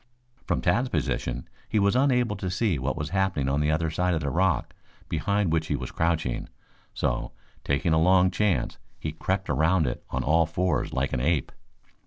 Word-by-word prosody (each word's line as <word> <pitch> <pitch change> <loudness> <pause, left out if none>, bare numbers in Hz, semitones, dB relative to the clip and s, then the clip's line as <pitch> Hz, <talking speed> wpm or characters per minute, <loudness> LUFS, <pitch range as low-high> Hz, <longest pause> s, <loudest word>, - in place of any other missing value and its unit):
From - - 0
Tad's 125 +2 +2
position 60 - -2 0.2
he - - 0
was 100 +2 +3
unable 125 -4 +2
to 95 -1 -3
see 95 - 0
what 65 +3 -2
was 75 0 -3
happening 95 -8 0
on 70 +2 +1
the 75 0 +1
other 80 +1 +1
side 90 +2 +1
of 80 - -1
the 70 -1 -2
rock 95 -1 +1 0.4
behind 100 +2 0
which 80 -1 0
he - - 0
was - - -5
crouching, 80 -6 -1 0.4
so, - - -2 0.3
taking 70 +4 +1
a 80 - +3
long 90 +1 +5
chance, 105 -1 0 0.2
he 75 - -3
crept 95 +4 -2
around 80 +1 +2
it - - -3
on 65 0 -2
all 80 +3 +3
fours 85 -1 0
like 70 +1 -1
an 60 - 0
ape. 75 0 +1
85 Hz, 190 wpm, -26 LUFS, 75-95 Hz, 0.4 s, long